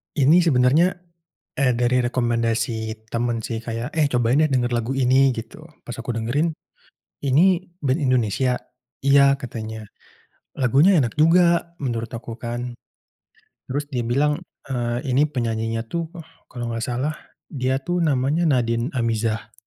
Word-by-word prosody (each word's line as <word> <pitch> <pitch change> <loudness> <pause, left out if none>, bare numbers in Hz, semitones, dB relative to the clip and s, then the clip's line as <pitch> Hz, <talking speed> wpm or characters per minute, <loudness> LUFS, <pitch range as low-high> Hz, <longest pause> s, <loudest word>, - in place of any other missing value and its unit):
Ini 160 +5 +5
sebenarnya, 145 +5 +4 0.6
eee, 140 -4 +2
dari 125 +1 +2
rekomendasi 115 -2 -1
teman 115 +1 -1
sih 115 0 -4
kayak, 115 +4 -5
"Eh 150 -3 +2
cobain 125 +3 +2
deh 155 - +2
dengar 125 -2 +1
lagu 120 +1 -1
ini," 135 0 +3
gitu. 115 +5 -7 0.2
Pas 120 - -5
aku 130 - -6
dengerin, 120 +8 0 0.7
"Ini 175 +6 +2
band 135 +1 +1
Indonesia?", 130 - +1 0.5
"Iya," 140 0 +5
katanya. 110 -2 -6 0.7
Lagunya 140 - +4
enak 120 0 -3
juga, 170 +2 +4
menurut 115 -3 -3
aku 115 0 -7
kan. 120 0 -5 0.9
Terus 145 +3 -2
dia 125 - 0
bilang, 145 +7 +1 0.2
eee, 120 0 -2
"Ini 140 +3 +2
penyanyinya 115 -3 -2
tuh, 165 +6 -4 0.4
kalau 120 -2 -5
nggak 115 - -3
salah 130 +5 -2 0.3
dia 130 -1 -1
tuh 175 +6 -2
namanya 145 0 +1
Nadin 120 -2 +1
Amizah." 115 -1 -1
125 Hz, 135 wpm, -22 LUFS, 115-145 Hz, 0.9 s, Ini